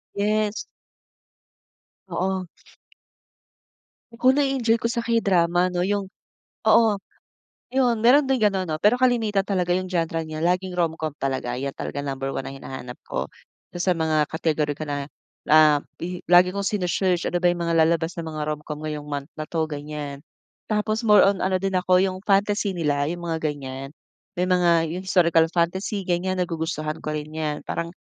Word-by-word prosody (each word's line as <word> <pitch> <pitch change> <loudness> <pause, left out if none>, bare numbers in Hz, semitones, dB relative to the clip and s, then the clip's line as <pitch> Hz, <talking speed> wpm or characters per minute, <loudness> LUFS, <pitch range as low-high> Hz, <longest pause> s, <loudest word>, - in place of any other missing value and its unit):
Yes. 210 +1 0 1.4
Oo. 185 +1 -2 1.7
Ku 260 +1 +5
nae-enjoy 270 -5 +2
ko 230 0 -1
sa 235 - -2
K-drama 185 -6 +2
'no, 180 +1 0
yung 200 -2 -2 0.6
oo, 220 -4 +5 0.7
'yon 250 -3 +3
meron 265 +5 +4
din 265 - +3
gano'n 195 -5 +1
'no, 155 - -1
pero 210 +7 +4
kalimitan 235 -5 +2
talaga 180 -3 0
yung 185 0 -1
genre 165 -2 -1
niya 155 -1 -6
laging 180 +2 0
romcom 160 -2 0
talaga, 130 -2 -2
yan 135 +1 -3
talaga - - -6
number 135 0 -3
1 135 - -4
na - - -6
hinahanap 130 -2 -8
ko. - - -3 0.5
Sa 175 0 0
mga 155 -2 +1
category 155 -2 -1
ko 155 - -5
na, 145 0 -4 0.4
ah, 155 -2 +6 0.2
i 180 +1 -5
lagi 180 +1 +6
kong 200 - -2
sine-search, 180 -2 0
ano 175 +1 -1
ba 175 - +4
yung 175 - 0
mga 170 - 0
lalabas 165 +1 +2
na 170 - -5
mga 155 -2 -5
romcom 150 0 -7
ngayong 150 -1 -5
month 140 +1 -4
na 155 -1 -7
'to, 160 -2 0
ganyan. 145 -1 -6 0.5
Tapos, 215 +1 0
more 210 -2 +6
on 195 -1 +1
ano 190 0 +1
din 195 0 -2
ako, 185 0 +3
yung 190 -1 0
fantasy 205 0 +2
nila, 145 -2 0
yung 175 0 -5
mga 165 -1 -2
ganyan, 135 -1 -6 0.5
may 180 - +1
mga, 175 -2 +3
yung 180 - -4
historical 170 -3 +4
fantasy, 190 +3 -1
ganyan, 185 +1 0
nagugustuhan 160 -3 -2
ko - - -3
rin 150 0 -4
yan, 155 -2 -2
parang 170 0 -3
175 Hz, 165 wpm, -24 LUFS, 155-195 Hz, 1.7 s, ah